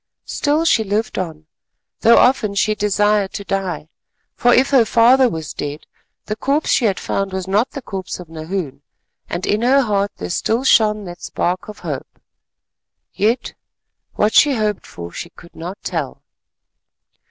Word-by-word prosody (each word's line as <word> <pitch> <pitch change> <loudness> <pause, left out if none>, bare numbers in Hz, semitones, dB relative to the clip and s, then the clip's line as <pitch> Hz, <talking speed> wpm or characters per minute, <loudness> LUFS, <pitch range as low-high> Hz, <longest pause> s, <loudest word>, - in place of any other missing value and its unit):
Still 300 +2 0
she 225 -9 +3
lived 210 +1 -1
on, 160 -4 -5 0.5
though 235 - +6
often 245 -5 +3
she 215 +1 +2
desired 210 -1 +1
to 200 - -5
die, 190 -6 -3 0.5
for 245 - +3
if 260 +4 +4
her 265 -4 +6
father 240 +3 +5
was 160 -6 -5
dead, 145 +1 -5 0.4
the 215 - -3
corpse 280 +7 0
she 245 - +3
had 195 -3 +1
found 195 -1 -2
was 190 -1 -3
not 210 +7 +2
the 275 - -8
corpse 190 -4 -5
of 180 - -9
Nahoon, 160 -2 -5 0.5
and 175 +2 -3
in 210 +2 +1
her 265 +3 +4
heart 205 -4 0
there 90 0 -5
still 230 +4 0
shone 215 -5 +4
that 175 -2 -9
spark 180 +1 -2
of 210 - -9
hope. - - -6 0.9
Yet 230 +5 0 0.6
what 210 +1 +2
she 290 -2 +5
hoped 210 -3 -1
for 85 0 -9
she 170 - -7
could 170 0 -17
not 175 +5 -6
tell. - - -4
205 Hz, 165 wpm, -19 LUFS, 180-230 Hz, 0.9 s, though